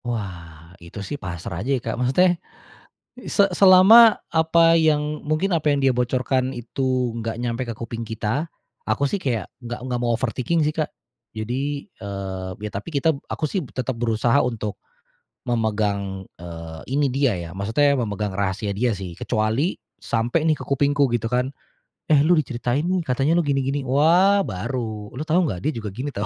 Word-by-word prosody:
Wah, 85 -8 -6
itu 85 +2 -12
sih - - -6
pasrah 85 -1 -5
aja 135 +5 +1
ya, - - -4
Kak, 115 - -1
maksudnya 135 +9 +3 1.0
se 200 - +4
selama 200 +5 +8 0.2
apa 165 +1 +4
yang 150 -2 +2
mungkin 155 +6 0
apa 155 -2 +1
yang 145 -1 +2
dia 135 - +4
bocorkan 130 +1 0
itu 125 +1 -1
nggak 115 0 -4
nyampe 120 +1 -2
ke - - -2
kuping 115 0 -5
kita, 115 +7 -2 0.4
aku 115 +6 +1
sih 185 +7 -1
kayak 115 -8 -1 0.2
nggak 120 0 -6
nggak 125 -1 -2
mau 120 -1 +1
overthinking 130 +6 0
sih, 150 - 0
Kak. 155 -1 -1 0.5
Jadi 135 +6 -3
eee, 95 -2 -6
ya 105 0 -5
tapi 100 +10 -5
kita 160 +1 +2 0.2
aku 155 - -2
sih 185 +5 -1
tetap 130 0 -3
berusaha 115 +3 +2
untuk 110 -4 -3 0.6
memegang, 105 -4 -1 0.2
eee, 85 -2 -8
ini 140 0 +1
dia 135 -2 +2
ya, 85 -1 -6
maksudnya 110 +10 +2
memegang 105 -6 -2
rahasia 100 +1 -2
dia 110 +2 0
sih. 95 -2 -6
Kecuali 110 - -1 0.2
sampai 120 +8 0
nih 155 - +3
ke - - -8
kupingku 145 +1 +2
gitu 120 -1 0
kan, 125 +3 0 0.6
“Eh 155 - +6
lu 175 - +5
diceritain 130 -4 0
nih, 185 -2 0
katanya 135 +5 +1
lu 170 - +2
gini-gini.” 135 0 0
Wah 170 +9 +4
baru, 110 - -4
“Lu 130 - -5
tahu 165 +3 +2
nggak 95 - -3
dia 150 - 0
juga 110 -8 -5
gini 130 +7 -4
tahu.” 105 -6 -3
125 Hz, 170 wpm, -23 LUFS, 110-150 Hz, 1.0 s, selama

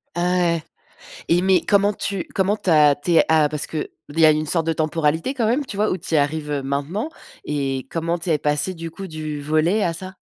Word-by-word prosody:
Ah 180 +1 +1 0.2
ouais. 160 -2 -3 0.6
Et 175 +1 +3
mais 190 -2 +3
comment 205 0 +2
tu 195 -2 -3
comment 200 +2 +1
tu 185 - -3
as 150 -3 +6
tu 160 +4 -3
es, - - +6
heu, - - +6
a 155 -2 +4
parce 150 -1 -3
que 155 -2 -4 0.2
il 160 +3 -5
y 160 - +7
a 155 - +7
une 155 +1 0
sorte 165 +1 0
de 165 - +2
temporalité 160 - 0
quand 235 -5 0
même, 265 +5 +1
tu 205 - -7
vois? 215 +1 +2
Où 185 - -1
tu 165 -1 -3
y - - +5
arrives, 150 +1 0
heu, 140 -2 -2
maintenant, 145 - -2 0.4
et 135 -3 -2
comment 170 +1 -1
tu 170 +1 -5
es 155 - +3
passée 150 +6 0
du 165 -1 -7
coup 195 +2 -8
du 155 -2 -5
volley 155 +8 +1
à 170 - 0
ça? 185 +2 -8
165 Hz, 250 wpm, -21 LUFS, 150-185 Hz, 0.6 s, y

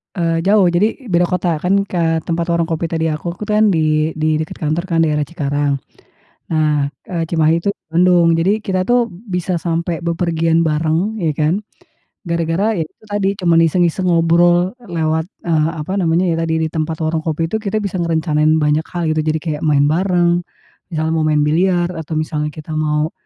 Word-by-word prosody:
Eee, 165 -1 0
jauh 200 -2 +4
jadi 210 +7 0
beda 175 0 +3
kota 175 -2 -1
kan 180 +2 +2 0.2
ke 180 - -3 0.2
tempat 170 +1 -2
warung 170 -1 0
kopi 165 0 -1
tadi 160 0 -1
aku 165 +3 -3
tuh - - -19
kan 210 -1 +2
di 155 -1 +1
di 155 0 0
dekat 155 0 -5
kantor 155 +3 0
kan 165 -1 +1
daerah 150 -2 +1
Cikarang. 145 -1 -1 0.8
Nah, 150 -3 +1 0.2
eee, 165 -5 -3
Cimahi 160 -1 +2
itu 200 - -2 0.2
Bandung 175 -1 +4
jadi 175 +6 +2
kita 185 -1 0
tuh 245 0 +4 0.4
bisa 180 -1 -1
sampai 170 0 -2
bepergian 165 -1 +1
bareng 160 +7 0
ya 155 -4 -1
kan. 160 +6 +1 0.6
Gara-gara 170 +2 -1
ya 160 - 0
itu - - -27
tadi 200 -1 +1
cuman 170 -2 +3
iseng-iseng 175 +2 +1
ngobrol 175 +2 +3 0.2
lewat, 160 0 0 0.2
eee, 160 -2 +2
apa 150 - -5
namanya 170 +1 +2
ya - - 0
tadi 165 -1 -1
di 160 - -1
tempat 160 0 -2
warung 160 0 0
kopi 160 0 -1
itu - - +2
kita 215 0 -3
bisa 185 -2 -2
ngerencanain 160 -2 +1
banyak 150 +2 +1
hal 175 -1 -2
gitu, 155 - 0
jadi 155 0 +1
kayak 155 -1 -3
main 145 -1 +4
bareng, 175 0 +2 0.5
misalnya 160 -2 -2
mau 155 - +1
main 150 -1 +2
biliar, 175 +3 +2
atau 160 0 -5
misalnya 155 -1 -2
kita 155 0 -8
mau 150 +1 0
165 Hz, 185 wpm, -17 LUFS, 155-175 Hz, 0.8 s, jauh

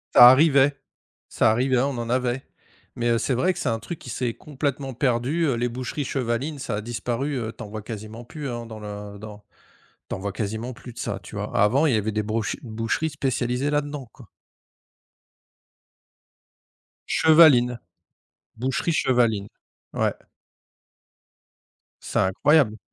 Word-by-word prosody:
Ça 120 0 +11
arrivait 140 0 +5 0.6
ça - - +3
arrivait, 130 +3 +2
on 140 +3 +1
en 115 0 -4
avait, 125 +1 0 0.5
mais 120 0 0
heu, 115 - +3
c'est 130 - 0
vrai 180 +10 +2
que 175 - -8
c'est - - 0
un 115 - 0
truc 150 +9 -7
qui - - -10
s'est 120 -1 -2
complètement 140 -1 -4
perdu, 130 +6 +1
heu, 140 - +2
les 120 +1 -1
boucheries 130 +4 -4
chevalines, 130 +4 -2
ça 125 -5 -3
a - - -3
disparu, 120 +5 -3
heu, 115 -1 -4
tu - - -8
en 105 - -9
vois 110 0 -6
quasiment 110 +2 -8
plus, 145 +2 -6
hein, 120 -1 -5
dans 110 -1 -9
le 105 -1 -8
dans 105 -1 -10 0.6
tu - - -2
en - - -7
vois 100 +1 -3
quasiment 110 +4 -3
plus 120 0 -11
de - - -21
ça, - - -3
tu - - -10
vois? - - -4
Avant 125 +10 +4
il 135 - +2
y - - +3
avait 110 0 -1
des 110 0 0
brouche 110 +1 -2
boucheries 115 +7 -2
spécialisées 130 -1 -1
là-dedans, 145 -4 -2
quoi. - - -15 2.8
Chevaline, 145 -7 +5 0.8
boucherie 130 +8 -1
chevaline, 115 -8 +2 0.5
ouais. - - +1 1.9
C'est - - -2
incroyable! 110 +3 +3
120 Hz, 160 wpm, -24 LUFS, 110-140 Hz, 2.8 s, Ça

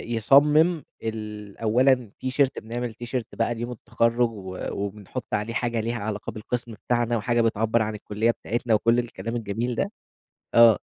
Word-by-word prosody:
يصمم 150 +8 +5 0.2
ال 105 -2 -5
أولّاً 125 +1 +3
تيشيرت 130 +1 +1
بنعمل 120 +1 -4
تيشيرت 120 +1 -5
بقى 115 +1 0
ليوم 120 +2 -4
التخرُّج 115 0 +1
و 95 -4 -8
وبنحط 100 +4 -5
عليه 105 +2 -1
حاجة 120 -1 -1
ليها 115 +2 -2
علاقة 105 -1 -4
بالقسم 115 +2 -4
بتاعنا 120 +2 0
وحاجة 120 +2 +1
بتعبّر 115 0 +2
عن 110 0 -1
الكُلّية 105 +2 0
بتاعتنا 115 0 -2
وكل 115 +3 +3
الكلام 115 -1 -4
الجميل 115 +2 -2
ده. 200 - -1 0.6
آه. 115 -3 +8
115 Hz, 150 wpm, -25 LUFS, 110-120 Hz, 0.6 s, آه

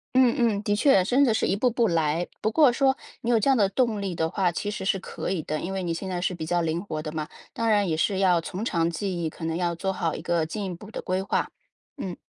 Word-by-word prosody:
嗯 255 -2 +5
嗯。 220 -4 +1
的 205 0 +1
确， 205 -4 +4
真 250 +9 +3
的 235 -5 +4
是 - - +1
一 195 - +1
步 250 +4 +2
步 235 -1 +1
来。 165 0 +1
不 220 - +1
过 290 -1 +5
说 265 0 +2 0.2
你 235 - -3
有 235 -2 +4
这 245 - +1
样 270 - +5
的 200 -4 +3
动 220 -1 0
力 190 -3 -3
的 160 0 0
话， 180 0 +1
其 205 +4 -3
实 205 - -5
是 195 0 +1
可 - - -5
以 185 -3 -1
的， 155 0 -3
因 185 - -4
为 190 -1 -2
你 170 -1 -1
现 190 +3 -5
在 180 -1 -2
是 180 +1 -1
比 160 -2 -5
较 175 +1 +1
灵 165 +1 -1
活 155 -6 -4
的 155 0 -5
嘛， 155 -1 -4 0.3
当 230 -1 0
然 205 -3 +3
也 160 - 0
是 190 +4 +1
要 180 -3 +4
从 185 +6 -5
长 165 -6 +1
计 175 0 -3
议， 160 - 0
可 160 - -8
能 160 0 -1
要 175 -1 -1
做 190 +3 -2
好 165 -3 -1
一 - - -6
个 170 -2 0
进 205 +5 -4
一 185 - -4
步 205 +5 -11
的 - - -6
规 185 0 -1
划， 195 - -1 0.5
嗯。 190 -9 -4
190 Hz, 315 characters per minute, -26 LUFS, 170-215 Hz, 0.5 s, 嗯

